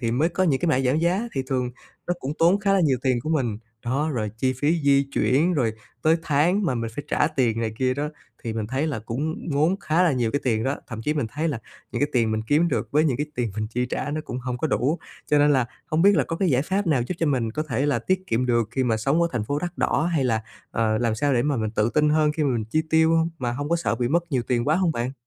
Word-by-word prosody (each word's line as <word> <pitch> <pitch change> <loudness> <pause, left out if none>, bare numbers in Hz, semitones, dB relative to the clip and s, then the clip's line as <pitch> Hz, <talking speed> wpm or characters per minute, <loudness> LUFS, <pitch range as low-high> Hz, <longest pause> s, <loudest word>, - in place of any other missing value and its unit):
thì 115 -3 -1
mới 150 +8 +2
có 180 +2 -1
những 140 -7 +2
cái 175 - 0
mã 135 -4 +3
giảm 135 +3 +1
giá, 185 +8 0
thì 135 - -1
thường 125 -2 -1 0.4
nó 175 - 0
cũng 135 +3 -3
tốn 175 +4 +4
khá 200 -1 +2
là 195 - +4
nhiều 140 -7 +2
tiền 130 -3 +1
của 155 - -3
mình. 125 -9 0 0.3
Đó, 140 +6 0
rồi 110 -6 -2
chi 130 +2 +1
phí 145 +6 0
di 140 -1 +4
chuyển, 160 +8 +2
rồi 120 -7 +1 0.3
tới 160 +1 +4
tháng 165 +7 +2
mà 135 - +1
mình 115 -1 -3
phải 145 - -5
trả - - +2
tiền 115 -4 0
này 110 -1 -1
kia 130 -1 +1
đó 145 +2 -2 0.4
thì 115 - -2
mình 110 -1 -3
thấy 130 +6 -1
là 145 -7 -2
cũng 145 +10 -4
ngốn 155 +6 +2
khá 160 +1 +2
là 175 -4 +3
nhiều 120 -4 0
cái 145 - -1
tiền 110 -4 +1
đó, 135 +2 0
thậm 115 -2 -6
chí 150 +6 0
mình 145 -6 0
thấy 155 +3 -1
là 140 -7 -2 0.3
những - - -2
cái 145 - +2
tiền 115 -3 +2
mình 110 0 -1
kiếm 155 +7 +3
được - - -1
với 150 +2 +4
những 140 -6 +1
cái 145 +3 -2
tiền 120 -5 -1
mình 110 0 -1
chi 125 +3 -2
trả 135 +3 -3
nó 155 - -2
cũng 125 - -5
hông 125 -1 -4
có 160 - 0
đủ. 150 +3 0 0.3
Cho 150 - +3
nên 145 0 +5
là 130 -4 +2 0.2
hông 160 0 +1
biết 200 0 +6
là 145 - +3
có 165 - -4
cái 190 +1 +1
giải 130 -1 +3
pháp 195 +5 -1
nào 145 -7 +2
giúp 180 - -3
cho 165 - +1
mình 125 -6 0
có 155 - -2
thể 135 +2 0
là 145 -5 +2
tiết 185 +9 -1
kiệm 120 +3 0
được 120 -3 +1
khi 130 - 0
mà 115 -3 +1
sống 135 +9 +1
ở 170 - +2
thành 120 -4 -1
phố 145 +6 -1
đắt 175 +2 -5
đỏ 160 - +1
hay 150 -5 +1
là, 115 -3 +1 0.3
ờ, 110 -1 +1
làm 115 -2 +1
sao 145 +5 +1
để 120 - +2
mà 145 0 0
mình 110 -2 -1
tự 110 +1 +1
tin 150 0 +4
hơn 155 0 +3
khi 155 - -2
mà 140 - +2
mình 110 -2 -1
chi 155 +9 0
tiêu 160 +1 +4
hông, 165 0 +2
mà 120 -2 -2
hông 145 +3 -4
có 170 - +2
sợ 165 -8 -1
bị 120 0 -1
mất 170 +5 +1
nhiều 130 -3 +1
tiền 120 -2 +1
quá 155 - +4
hông 180 -3 +2
bạn? 120 -1 -2
140 Hz, 300 wpm, -24 LUFS, 120-160 Hz, 0.4 s, biết